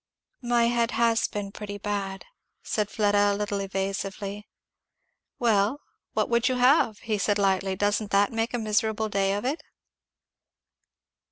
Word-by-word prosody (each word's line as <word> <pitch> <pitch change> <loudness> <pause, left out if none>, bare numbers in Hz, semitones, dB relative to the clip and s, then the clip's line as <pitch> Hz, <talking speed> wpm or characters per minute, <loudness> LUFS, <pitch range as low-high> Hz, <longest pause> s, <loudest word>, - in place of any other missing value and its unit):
"My 240 -1 +2
head 235 0 +2
has 230 -1 +3
been 205 -1 -5
pretty 205 0 -7
bad, 200 -1 -4 0.2
" - - -51
said 210 -2 -1
Fleda 205 -1 +2
a - - -1
little 205 0 -2
evasively. 195 +1 -4 0.9
"Well, 225 +2 +2 0.3
what - - +1
would 235 +2 +2
you 255 - 0
have?" 250 -3 +4 0.2
said 205 +1 +1
he 200 - 0
lightly; 190 0 +1
"doesn't 205 +1 0
that 200 +2 +2
make 225 +2 -1
a - - 0
miserable 220 0 0
day 195 -1 +1
of 205 - -4
it?" 285 +5 -1
205 Hz, 150 wpm, -26 LUFS, 200-230 Hz, 0.9 s, have